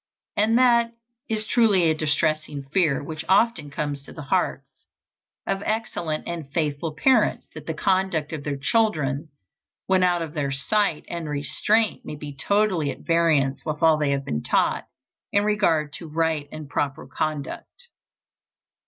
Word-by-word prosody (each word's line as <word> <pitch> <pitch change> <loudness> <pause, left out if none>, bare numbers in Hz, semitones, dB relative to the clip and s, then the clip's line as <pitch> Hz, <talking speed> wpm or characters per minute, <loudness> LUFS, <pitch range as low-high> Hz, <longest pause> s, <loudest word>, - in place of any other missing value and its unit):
And 220 +3 +3
that 235 -2 +4 0.4
is 215 -1 -1
truly 220 -6 +4
a 160 -1 +4
distressing 155 -1 0
fear 160 -8 +2
which 155 +1 -5
often 190 -6 +3
comes 145 0 -3
to 140 - -14
the 160 - -8
hearts 140 - -2 0.6
of 195 - -1
excellent 175 -8 -2
and 165 -5 -5
faithful 150 0 -1
parents, 265 - +3
that - - -10
the - - -2
conduct 185 -5 0
of 150 -3 -5
their 145 -1 -2
children 155 -5 0 0.6
when 190 -1 +3
out 175 -2 +2
of 155 -2 -7
their 145 -2 -1
sight 170 +5 0
and 170 -3 -5
restraint 210 +9 +1
may - - -6
be 145 -1 -8
totally 190 -1 +1
at - - -6
variance 160 -5 +2
with 155 0 -3
all 160 -1 +6
they 150 -2 +1
have 140 -1 -1
been 75 0 -2
taught - - +1 0.4
in 205 - +3
regard 165 -9 +1
to 165 - -8
right 160 -2 -1
and 155 -1 -7
proper 145 +1 -2
conduct. 155 - -5
160 Hz, 155 wpm, -24 LUFS, 145-195 Hz, 0.6 s, all